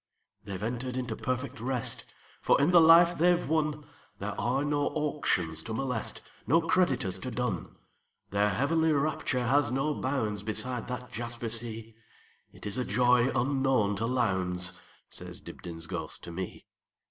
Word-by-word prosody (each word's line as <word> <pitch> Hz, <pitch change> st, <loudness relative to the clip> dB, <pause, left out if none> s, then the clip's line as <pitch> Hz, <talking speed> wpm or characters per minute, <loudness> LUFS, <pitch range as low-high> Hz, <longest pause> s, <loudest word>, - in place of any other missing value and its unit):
"They 100 Hz, -3 st, -4 dB
've 95 Hz, -, -8 dB
entered 125 Hz, +2 st, -3 dB
into 125 Hz, -1 st, -2 dB
perfect 130 Hz, 0 st, -3 dB
rest; 125 Hz, 0 st, 0 dB, 0.3 s
For -, -, +4 dB
in 145 Hz, +5 st, +4 dB
the 175 Hz, -1 st, +8 dB
life 170 Hz, +2 st, +7 dB
they 175 Hz, +2 st, +5 dB
've -, -, -4 dB
wonThere 150 Hz, -1 st, -3 dB
are 135 Hz, +4 st, 0 dB
no 145 Hz, -1 st, +1 dB
auctions 115 Hz, -, -1 dB
to 110 Hz, +6 st, -5 dB
molest, 125 Hz, -3 st, -3 dB, 0.2 s
No 165 Hz, +5 st, +5 dB
creditors 135 Hz, -, +1 dB
to 125 Hz, -, -5 dB
dun. 125 Hz, -1 st, -3 dB, 0.6 s
Their 100 Hz, +1 st, +3 dB
heavenly 160 Hz, +10 st, +2 dB
rapture 140 Hz, -3 st, 0 dB
has 140 Hz, +1 st, +3 dB
no 135 Hz, +4 st, 0 dB
boundsBeside 115 Hz, -2 st, -2 dB
that 125 Hz, 0 st, -6 dB
jasper 120 Hz, 0 st, -4 dB
sea; 115 Hz, -1 st, -5 dB, 0.6 s
It -, -, -12 dB
is 105 Hz, +5 st, -1 dB
a -, -, +1 dB
joy 125 Hz, 0 st, +3 dB
unknown 130 Hz, -5 st, +2 dB
to 115 Hz, -, -1 dB
Lowndes,"Says 90 Hz, -7 st, -2 dB
Dibdin's 80 Hz, -2 st, -8 dB
ghost 80 Hz, -3 st, -5 dB
to 85 Hz, -, -7 dB
me. 90 Hz, +2 st, -6 dB
125 Hz, 145 wpm, -29 LUFS, 110-140 Hz, 0.6 s, the